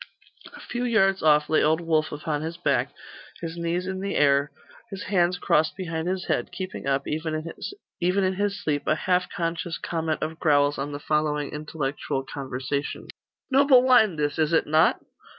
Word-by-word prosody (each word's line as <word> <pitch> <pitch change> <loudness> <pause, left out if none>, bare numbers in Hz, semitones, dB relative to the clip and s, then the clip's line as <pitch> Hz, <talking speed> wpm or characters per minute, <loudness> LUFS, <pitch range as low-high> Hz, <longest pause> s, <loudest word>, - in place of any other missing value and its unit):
A - - -11
few 245 0 -4
yards 195 -5 +2
off 150 -1 +4
lay 155 - +3
old 160 +1 +3
Wulf 160 -2 0
upon 150 0 -3
his 165 +2 -5
back, 175 - 0 0.5
his 165 -1 -5
knees 170 +1 -2
in 190 0 -4
the 195 +1 -3
air, 140 0 +3 0.4
his 195 -2 -6
hands 180 -2 +1
crossed 155 -2 +1
behind 165 -3 -3
his 185 0 -2
head, - - -1
keeping 185 -4 -6
up, 140 0 0
even 155 +1 -2
in 185 - -2
his 200 +1 -2
sleep, 145 -2 -1
a 155 - +3
half 180 +2 0
conscious 165 0 -3
comment 160 -2 -2
of 160 +1 -4
growls 145 -2 +3
on 140 +2 -3
the 145 - -5
following 150 -1 0
intellectual 145 -3 -3
conversation: 135 +1 -4 0.4
'Noble 270 -2 +6
wine 235 -8 +5
this, 145 0 -1
is 155 +1 +2
it 160 - +3
not? 155 +3 +3
160 Hz, 170 wpm, -25 LUFS, 150-185 Hz, 0.5 s, Noble